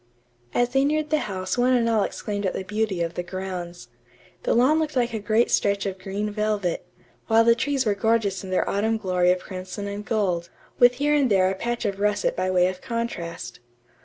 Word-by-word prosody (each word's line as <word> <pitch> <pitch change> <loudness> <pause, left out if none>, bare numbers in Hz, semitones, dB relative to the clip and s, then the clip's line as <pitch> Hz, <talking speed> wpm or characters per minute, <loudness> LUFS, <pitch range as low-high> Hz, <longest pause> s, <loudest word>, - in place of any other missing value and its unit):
As 245 0 +3
they 270 +2 +2
neared 305 +1 0
the 310 - +3
house 185 +3 -3
one 250 +1 +4
and 240 -2 +3
all 225 -2 +2
exclaimed 205 0 -2
at - - -2
the - - -3
beauty 205 -3 -1
of 165 0 -3
the - - -3
grounds. 175 -6 -6 0.5
The - - +1
lawn 265 +7 +4
looked 305 -2 -2
like 240 -2 +1
a 220 - -2
great 215 +3 +2
stretch 200 0 +1
of 190 -1 -4
green 200 +3 -3
velvet, 210 -4 -1 0.4
while 225 0 +5
the 230 0 +6
trees 270 +2 0
were 210 - +2
gorgeous 205 -2 0
in 190 - -7
their 185 - +1
autumn 220 +3 +1
glory 180 -3 +1
of 180 0 0
crimson 185 +2 -6
and 200 +1 -5
gold, 185 -6 -1 0.3
with 245 0 +6
here 290 +3 +1
and 285 -4 +3
there 190 -2 +3
a - - -3
patch 240 +4 -3
of 200 -1 -2
russet 205 0 +1
by 185 0 -1
way 180 -1 +3
of 185 0 -5
contrast. 205 -8 -5
205 Hz, 215 wpm, -24 LUFS, 185-235 Hz, 0.5 s, the